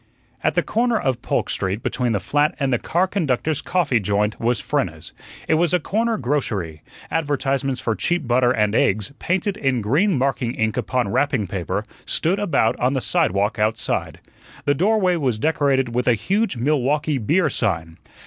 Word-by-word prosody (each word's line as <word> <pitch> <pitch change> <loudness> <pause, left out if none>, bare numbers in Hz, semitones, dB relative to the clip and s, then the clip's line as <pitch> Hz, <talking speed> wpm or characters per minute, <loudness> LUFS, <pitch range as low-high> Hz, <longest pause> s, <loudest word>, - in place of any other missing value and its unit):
At - - +1
the - - +2
corner 235 0 +1
of 130 -3 -1
Polk - - -1
Street, 95 +4 -2
between 125 -2 -1
the 105 - +1
flat 145 - +1
and 135 -2 +1
the 120 - +2
car 175 +3 +1
conductors' 155 -5 -1
coffee 150 -10 +1
joint, 105 +2 0
was 115 -1 +1
Frenna's. - - -3 0.3
It - - +2
was 175 0 +2
a - - +2
corner 225 +7 0
grocery; 105 - -2 0.3
advertisements 140 -4 -1
for 115 - 0
cheap 175 +4 -1
butter 120 +1 +3
and 105 -4 +1
eggs, 105 +2 +1
painted 190 +3 -1
in 135 - 0
green 150 - +2
marking 130 -2 -1
ink 110 -1 0
upon 125 -1 -1
wrapping 135 -3 +1
paper, 90 -2 -3 0.2
stood 185 +5 +1
about 145 - +2
on 125 +2 +1
the 135 - 0
sidewalk 100 -2 +1
outside. 110 +1 -1 0.5
The 145 - +3
doorway 185 +2 +2
was 130 -8 0
decorated 135 -3 +1
with 125 +1 -1
a 120 - +5
huge 190 - 0
Milwaukee 145 +2 +1
beer 155 - +2
sign. 80 -9 -2
130 Hz, 170 wpm, -21 LUFS, 110-160 Hz, 0.5 s, a